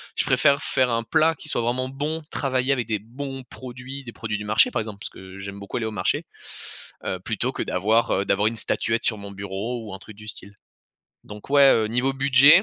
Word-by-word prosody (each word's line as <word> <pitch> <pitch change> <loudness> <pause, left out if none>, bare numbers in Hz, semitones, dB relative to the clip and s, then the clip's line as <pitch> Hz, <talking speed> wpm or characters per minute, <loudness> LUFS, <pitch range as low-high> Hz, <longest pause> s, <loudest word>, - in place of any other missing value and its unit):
je - - +1
préfère 140 +2 +4
faire 130 -1 +2
un 115 -1 +1
plat 160 +6 +3
qui - - -11
soit - - +3
vraiment 125 +2 0
bon, 150 +4 -3
travailler 130 0 +1
avec 120 -4 -2
des 110 - 0
bons 135 +5 -7
produits, 130 +2 -8
des 120 - -8
produits 110 -2 -4
du 105 - -5
marché 105 +1 +4
par - - 0
exemple, 105 -2 -5
parce - - -4
que 95 +1 -11
j'aime 100 +1 -7
beaucoup 100 - -5
aller 115 - -2
au 110 - -2
marché. 105 - 0 0.8
Heu, 95 - -2
plutôt 110 +6 -2
que - - -3
d'avoir, 110 +5 +2
heu, 100 - +1
d'avoir 100 +1 +2
une 115 - -1
statuette 115 0 0
sur 110 - +2
mon 100 -1 -8
bureau 100 +5 -4
ou 105 -3 -8
un - - -7
truc 110 - -12
du 105 +1 -12
style. 100 -1 -7 0.7
Donc, 105 0 -11
ouais, 140 -1 +7
heu, 110 -1 +3
niveau 125 +5 +1
budget, 140 +6 +7
115 Hz, 230 wpm, -24 LUFS, 105-135 Hz, 0.8 s, ouais